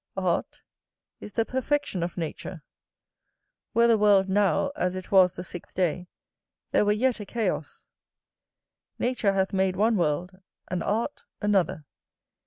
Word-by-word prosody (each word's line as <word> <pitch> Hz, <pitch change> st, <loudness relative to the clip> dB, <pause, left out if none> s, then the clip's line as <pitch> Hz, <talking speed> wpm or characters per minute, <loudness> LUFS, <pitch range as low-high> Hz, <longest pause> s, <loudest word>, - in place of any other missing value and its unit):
Art -, -, -1 dB, 0.6 s
is 210 Hz, -, -10 dB
the 225 Hz, -, +1 dB
perfection 260 Hz, -, -1 dB
of 170 Hz, +1 st, -3 dB
nature. 165 Hz, 0 st, -5 dB, 1.1 s
Were 235 Hz, 0 st, +5 dB
the 230 Hz, -2 st, +4 dB
world 200 Hz, -2 st, +4 dB
now 205 Hz, +7 st, +2 dB
as 180 Hz, 0 st, -1 dB
it 185 Hz, -1 st, -7 dB
was 185 Hz, -2 st, +6 dB
the 180 Hz, -, -6 dB
sixth 175 Hz, -2 st, -9 dB
day, 180 Hz, 0 st, 0 dB, 0.6 s
there -, -, +3 dB
were 205 Hz, -, +3 dB
yet 240 Hz, +3 st, +1 dB
a 210 Hz, -, -6 dB
chaos. 230 Hz, 0 st, -3 dB, 1.1 s
Nature 240 Hz, -5 st, +1 dB
hath 190 Hz, 0 st, 0 dB
made 190 Hz, -1 st, +1 dB
one 215 Hz, +3 st, +2 dB
world, 175 Hz, +3 st, -1 dB, 0.3 s
and 180 Hz, -2 st, -2 dB
art 225 Hz, +7 st, -2 dB
another. 190 Hz, -7 st, +1 dB
195 Hz, 140 wpm, -26 LUFS, 180-220 Hz, 1.1 s, was